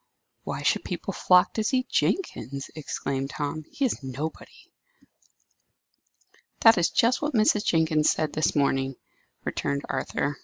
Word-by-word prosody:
"Why - - -4
should - - +2
people - - -4
flock 180 +2 +4
to 220 - -1
see 255 +3 +1
Jenkins?" 140 - -2
exclaimed 135 -3 -3
Tom. 150 +1 -4
"He 280 - -1
is 245 - -1
nobody." 140 +4 -7 1.9
"That 225 -4 +7
is 170 - +2
just 235 +2 +2
what 295 -2 -1
Mrs. 215 -1 +3
Jenkins 160 -2 +3
said 155 -1 0
this 155 - 0
morning," 135 -2 +1 0.5
returned 140 0 -2
Arthur. 135 +1 -2
155 Hz, 130 wpm, -26 LUFS, 140-215 Hz, 1.9 s, That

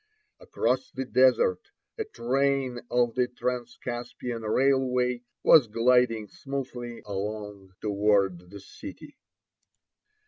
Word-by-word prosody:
Across 255 - -1
the 130 - -3
desert 130 -8 +3 0.3
a - - -3
train 130 +1 0
of 120 -1 +2
the 125 0 +1
Transcaspian 120 -1 -4
railway 125 +1 +1 0.2
was 140 -7 +7
gliding 115 -1 +2
smoothly 125 -2 -6
along 100 -1 -5
toward 100 -4 +1
the 100 +2 -10
city. 295 - -11
120 Hz, 95 wpm, -27 LUFS, 105-125 Hz, 0.3 s, was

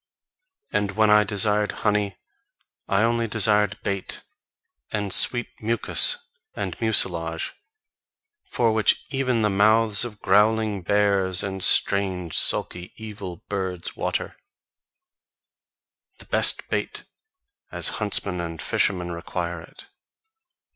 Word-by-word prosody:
And 105 -1 -1
when 110 +1 +3
I 105 0 +6
desired 105 0 0
honey 105 -2 0 0.7
I 100 +2 +1
only 115 0 0
desired 105 -2 +2
bait, 100 -1 -4 0.7
and 105 -3 -2
sweet 120 +5 +4
mucus 115 0 +3 0.4
and 95 -4 -4
mucilage, 85 -7 +1 1.0
for 115 -2 +1
which 110 -1 +2
even 130 -4 0
the 105 - +2
mouths 110 +2 +3
of 110 -4 -8
growling 105 +1 +2
bears, 100 -1 +1
and 95 -1 -5
strange, 95 -5 +1
sulky, 90 0 +4
evil 100 -5 -9
birds, 95 -3 -4
water: - - -3 1.8
The - - -14
best - - +1
bait, - - -3 0.7
as - - 0
huntsmen 100 -3 0
and 85 -2 -7
fishermen 90 0 -1
require 85 0 -5
it. - - -13
100 Hz, 105 wpm, -23 LUFS, 95-110 Hz, 1.8 s, I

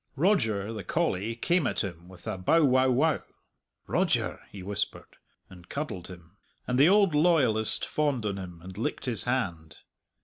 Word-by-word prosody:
Roger, 115 - +1
the 105 -3 -6
collie, 100 +5 -1
came 170 +4 +1
at - - -1
him 85 -3 -7
with 90 -2 -15
a - - -2
bow 150 - +3
wow 130 0 +4
wow. 145 +6 +2 0.6
"Roger!" - - 0
he 95 -2 -9
whispered, 100 +1 -4 0.3
and 90 -1 -15
cuddled 140 - -4
him, 90 +1 -13 0.3
and 125 0 0
the 145 +5 +7
old 200 -3 +4
loyalist 150 -9 +2
fawned 145 -7 -1
on 100 -2 -2
him 90 -3 -9
and 95 +2 -9
licked - - -3
his 115 -6 +1
hand. 85 -11 -2
110 Hz, 165 wpm, -28 LUFS, 95-145 Hz, 0.6 s, the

